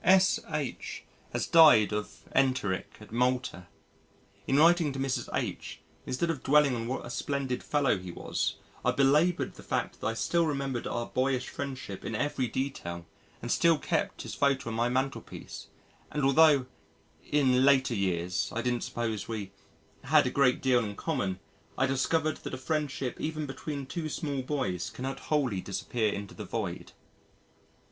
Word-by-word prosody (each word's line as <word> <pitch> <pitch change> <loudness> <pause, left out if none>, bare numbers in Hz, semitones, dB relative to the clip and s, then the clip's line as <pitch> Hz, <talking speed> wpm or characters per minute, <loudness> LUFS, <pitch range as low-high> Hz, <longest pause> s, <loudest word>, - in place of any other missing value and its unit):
S.H. 170 -7 +1 0.3
has - - -1
died 150 -11 +7
of 105 0 -4
enteric 130 -9 +1
at 105 - -14
Malta. 125 -7 0 0.8
In 135 - +3
writing 165 0 +5
to - - -5
Mrs. 135 -1 -1
H., - - -3 0.3
instead 165 +6 0
of 145 -6 -5
dwelling 145 -1 +4
on 115 -1 -3
what 130 +2 -3
a - - -7
splendid 135 -1 -2
fellow 145 -9 +1
he 90 0 -8
was - - -2 0.3
I - - +2
belaboured 150 +6 +3
the - - -13
fact - - -3
that - - -1
I 115 - -1
still 170 +7 +1
remembered 140 -4 -2
our 120 0 -2
boyish 130 0 0
friendship 130 -8 -6
in 110 - -3
every 145 +1 0
detail 95 -10 -4 0.4
and 120 - -2
still 165 -2 +4
kept - - -2
his - - -6
photo 135 -4 +1
on - - -4
my 120 +1 +1
mantelpiece 130 +2 -4 0.4
and 150 - -2
altho' 140 -1 +6 0.6
"in 130 -3 +3
later 135 -2 +4
years" 90 -3 -1
I 115 - -2
didn't 120 -1 0
suppose 115 -4 -3
we 105 -4 -4 0.5
"had - - +5
a - - 0
great 130 -3 +3
deal 125 -3 +4
in 105 -2 -5
common 100 - -2 0.4
I 130 - +3
discovered 155 +4 +1
that - - -6
a - - -6
friendship 140 -2 -2
even 155 -1 -2
between 140 +1 -5
two 155 +4 -4
small 145 -3 -2
boys 125 - -2
cannot 135 +1 -5
wholly 130 -11 +1
disappear 110 +3 -1
into 100 0 -6
the - - -7
void." - - -4
130 Hz, 160 wpm, -29 LUFS, 115-145 Hz, 0.8 s, died